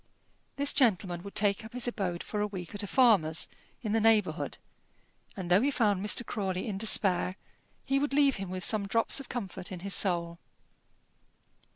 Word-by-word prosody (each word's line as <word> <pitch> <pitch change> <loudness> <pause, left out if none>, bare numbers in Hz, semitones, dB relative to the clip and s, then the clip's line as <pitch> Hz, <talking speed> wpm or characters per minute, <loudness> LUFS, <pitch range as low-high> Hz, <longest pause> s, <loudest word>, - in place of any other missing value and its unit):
This 285 0 +2
gentleman 185 -8 +1
would 200 +2 -10
take 205 0 +1
up 220 - -11
his 250 0 -1
abode 190 -7 -3
for 210 - -4
a 210 - 0
week 185 -4 -8
at 205 - -5
a 205 - -5
farmer's 195 -11 +3 0.4
in 215 - -2
the 225 - +2
neighbourhood, 220 -2 +2 0.8
and 180 -2 -5
though 185 +4 +5
he 275 - +2
found 210 -8 +1
Mr. 210 +3 +2
Crawley 190 -1 -3
in 195 -3 -4
despair, 190 -4 +1 0.5
he 275 0 +1
would 290 0 -1
leave 280 -1 +3
him 195 -1 -6
with 185 0 -5
some 210 -1 +2
drops 230 +6 +3
of 275 - -10
comfort 190 -6 -5
in 180 -2 -7
his 195 +1 -2
soul. 170 -3 +1
205 Hz, 185 wpm, -29 LUFS, 185-230 Hz, 0.8 s, though